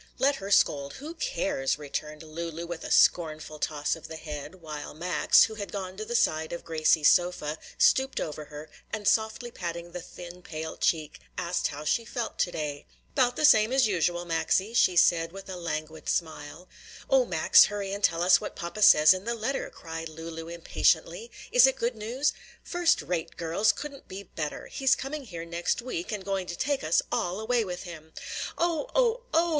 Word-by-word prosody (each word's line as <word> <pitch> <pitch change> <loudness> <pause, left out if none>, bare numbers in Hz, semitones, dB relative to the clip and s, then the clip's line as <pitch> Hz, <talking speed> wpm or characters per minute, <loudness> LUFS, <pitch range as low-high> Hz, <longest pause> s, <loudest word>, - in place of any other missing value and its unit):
"Let 275 +1 +2
her 195 0 -7
scold! 140 -8 +2
who 300 +4 -8
cares!" 290 - -1
returned 150 +1 -6
Lulu 165 +1 -6
with 170 -1 -6
a - - -6
scornful 155 -2 +2
toss 150 -1 -1
of 165 0 -11
the 160 - -8
head, 150 +1 -7
while 155 -5 -8
Max, 170 -1 +4
who 220 - -1
had 205 -2 -6
gone 190 -2 -5
to 215 - -4
the 235 - -4
side 160 -7 +1
of 170 - -5
Gracie's 155 -1 +3
sofa, 175 -4 +2 0.2
stooped 265 0 +3
over 150 -1 -5
her, 150 +1 -10 0.2
and 210 -2 -3
softly 220 +2 +1
patting 170 -3 -6
the 180 0 -6
thin 175 +1 -11
pale 160 -2 -6
cheek, 155 -2 -1 0.2
asked 175 +1 0
how 145 0 -7
she 230 - +1
felt 235 0 -5
to 175 - +1
day. 150 -3 -5 0.3
"'Bout 245 -2 +2
the 305 - +2
same 220 -5 +6
as 265 -1 +4
usual, 175 -2 0
Maxie," 175 +5 0
she 185 -6 +4
said, 165 -1 +4
with 195 +1 -10
a 190 - -6
languid 160 -2 -5
smile. 160 +1 -3 0.4
"O - - +4
Max, - - +6
hurry 200 -1 -4
and 200 0 -5
tell 170 -2 +2
us 180 0 +5
what - - -6
papa 175 +5 -6
says 155 -6 +8
in 185 +2 -6
the 235 0 -1
letter!" 245 +5 -2
cried 165 0 -7
Lulu 165 +1 -8
impatiently. 170 +4 0 0.2
"Is 250 +1 +7
it 265 - +1
good 235 +1 -1
news?" 240 +7 -1 0.3
"First 350 -2 +1
rate, 170 -3 -3
girls! 170 +6 +2
couldn't 285 -2 -9
be 195 +2 -8
better! 155 -5 -5
He's 265 -1 +2
coming 280 +1 -5
here 170 -6 -7
next 170 +1 -1
week 235 -8 -5
and 205 -3 -4
going 195 -2 -2
to 175 - -5
take 285 0 -1
us 155 +2 +2
all 180 +3 -1
away 230 +1 +1
with 180 -3 -6
him!" 160 -3 -11 0.4
"Oh! 345 +7 0
oh! 485 -1 +3
oh! 335 +1 +3
175 Hz, 195 wpm, -28 LUFS, 160-230 Hz, 0.4 s, says